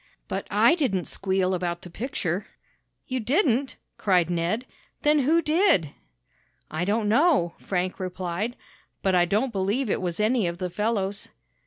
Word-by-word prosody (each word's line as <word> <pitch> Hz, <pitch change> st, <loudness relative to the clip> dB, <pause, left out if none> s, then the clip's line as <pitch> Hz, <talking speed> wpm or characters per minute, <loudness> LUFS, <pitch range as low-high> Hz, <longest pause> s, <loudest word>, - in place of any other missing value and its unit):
But -, -, -4 dB
I -, -, +5 dB
didn't 255 Hz, -, 0 dB
squeal 190 Hz, -1 st, 0 dB
about 175 Hz, -1 st, -2 dB
the 180 Hz, -, -9 dB
picture!" 195 Hz, -5 st, -3 dB, 0.6 s
"You 260 Hz, 0 st, -2 dB
didn't?" 265 Hz, -, +1 dB, 0.2 s
cried 180 Hz, -4 st, +2 dB
Ned. 175 Hz, +8 st, -1 dB, 0.4 s
"Then 300 Hz, 0 st, +4 dB
who 320 Hz, +5 st, +3 dB
did?" 305 Hz, -, +3 dB, 0.8 s
"I 160 Hz, +3 st, -1 dB
don't 210 Hz, +2 st, +1 dB
know," 240 Hz, -, +3 dB
Frank 185 Hz, -1 st, -2 dB
replied, 185 Hz, +4 st, -3 dB, 0.5 s
"but 190 Hz, -, +2 dB
I 175 Hz, -1 st, +5 dB
don't 215 Hz, +8 st, 0 dB
believe 205 Hz, +5 st, 0 dB
it -, -, 0 dB
was 175 Hz, -1 st, -3 dB
any 215 Hz, -2 st, +2 dB
of 170 Hz, 0 st, -3 dB
the 180 Hz, -1 st, -4 dB
fellows." 205 Hz, -1 st, -2 dB
200 Hz, 150 wpm, -25 LUFS, 180-255 Hz, 0.8 s, I